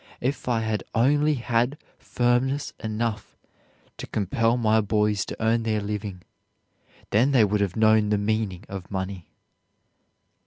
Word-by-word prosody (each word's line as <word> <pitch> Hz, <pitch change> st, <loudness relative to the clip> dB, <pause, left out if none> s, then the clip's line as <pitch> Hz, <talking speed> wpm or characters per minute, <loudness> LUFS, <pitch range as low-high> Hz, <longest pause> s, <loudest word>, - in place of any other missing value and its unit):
If 130 Hz, +2 st, -2 dB
I 115 Hz, -2 st, +1 dB
had 110 Hz, -1 st, -2 dB
only 145 Hz, +6 st, +3 dB
had 120 Hz, +2 st, 0 dB, 0.2 s
firmness 125 Hz, +4 st, 0 dB
enough 110 Hz, -1 st, -3 dB, 0.6 s
to -, -, -7 dB
compel 115 Hz, +4 st, 0 dB
my 110 Hz, -2 st, +3 dB
boys 105 Hz, -1 st, +1 dB
to -, -, -8 dB
earn 115 Hz, +1 st, +2 dB
their 110 Hz, -1 st, 0 dB
living, 100 Hz, -2 st, -5 dB, 0.9 s
then 125 Hz, +7 st, +3 dB
they 120 Hz, -5 st, +6 dB
would 105 Hz, 0 st, 0 dB
have 100 Hz, -3 st, -1 dB
known 110 Hz, -1 st, +4 dB
the 105 Hz, -, +2 dB
meaning 105 Hz, -2 st, -1 dB
of 95 Hz, -2 st, -7 dB
money." 95 Hz, -2 st, -5 dB
110 Hz, 140 wpm, -25 LUFS, 105-120 Hz, 0.9 s, they